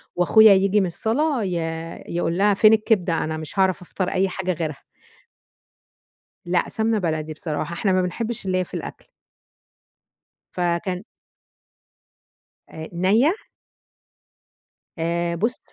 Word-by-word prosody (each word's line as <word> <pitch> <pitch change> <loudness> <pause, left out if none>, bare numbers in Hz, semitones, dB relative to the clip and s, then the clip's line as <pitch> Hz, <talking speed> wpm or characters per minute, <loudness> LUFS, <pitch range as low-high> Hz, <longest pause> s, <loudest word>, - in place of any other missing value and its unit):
وأخويا 210 +4 +6
ييجي 195 +2 +3
من 195 - +2
الصلاة 245 - 0
ي 185 -2 -2 0.5
يقول 170 0 -1
لها: 205 +1 +4
"فين 215 +2 +6
الكبدة؟ 195 -6 +1
أنا 155 0 -3
مش 155 +5 -7
هاعرف 190 -1 +2
أفطر 180 +1 -3
أي 190 +1 +1
حاجة 185 0 -2
غيرها." 155 -4 -5 1.6
لا 175 0 0
سَمنة 220 -1 0
بلدي 155 -3 -2
بصراحة، 155 +1 -4
إحنا 195 +3 0
ما 185 0 +3
بنحِبش 220 +5 -3
الليَّة 185 -1 0
في - - -14
الأكل. - - -7 1.5
فكان 180 +1 -2 1.7
آآ 160 0 -8
نَيّة؟ 210 - +3 1.7
آآ 170 +1 -1
بُص 230 +5 0
185 Hz, 120 wpm, -22 LUFS, 170-210 Hz, 1.7 s, وأخويا